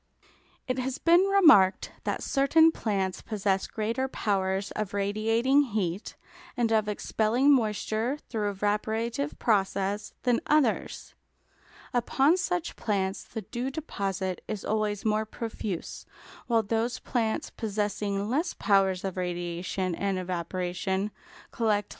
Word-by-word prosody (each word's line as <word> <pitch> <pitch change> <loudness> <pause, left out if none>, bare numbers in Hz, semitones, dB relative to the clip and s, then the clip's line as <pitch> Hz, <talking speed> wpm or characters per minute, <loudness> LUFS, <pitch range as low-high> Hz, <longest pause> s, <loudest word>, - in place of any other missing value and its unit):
It 255 0 -1
has 260 +2 -2
been 345 +4 +5
remarked 310 - +5
that - - -2
certain 320 +4 +4
plants 195 -8 -2
possess 195 -3 -1
greater 230 +5 -2
powers 195 -4 -1
of 210 -2 -4
radiating 225 +7 +2 0.2
heat 185 0 -2 0.4
and 235 -2 +1
of 215 -1 +2
expelling 225 +6 +2
moisture 220 +2 0
through 210 -3 -1
evaporative 210 -4 -1
process 200 -1 0
than 245 -2 +3
others; 300 -2 +1 0.8
upon 265 +6 +3
such 355 -2 -2
plants 195 -3 -1
the 220 - -7
dew 240 +7 -3
deposit 195 - -3
is 215 -3 -4
always 210 -1 -1
more 215 0 +2
profuse, 220 -4 -5 0.4
while 230 -2 +3
those 225 +3 -1
plants 225 -3 -2
possessing 205 -2 -2
less 310 +9 -1
powers 195 -3 +2
of 190 -1 -4
radiation 175 +1 -2
and 195 +2 -1
evaporation, 185 +2 -2 0.4
collect - - -19
little 215 -3 +3
dew. 205 - -28
215 Hz, 125 wpm, -28 LUFS, 195-240 Hz, 0.8 s, been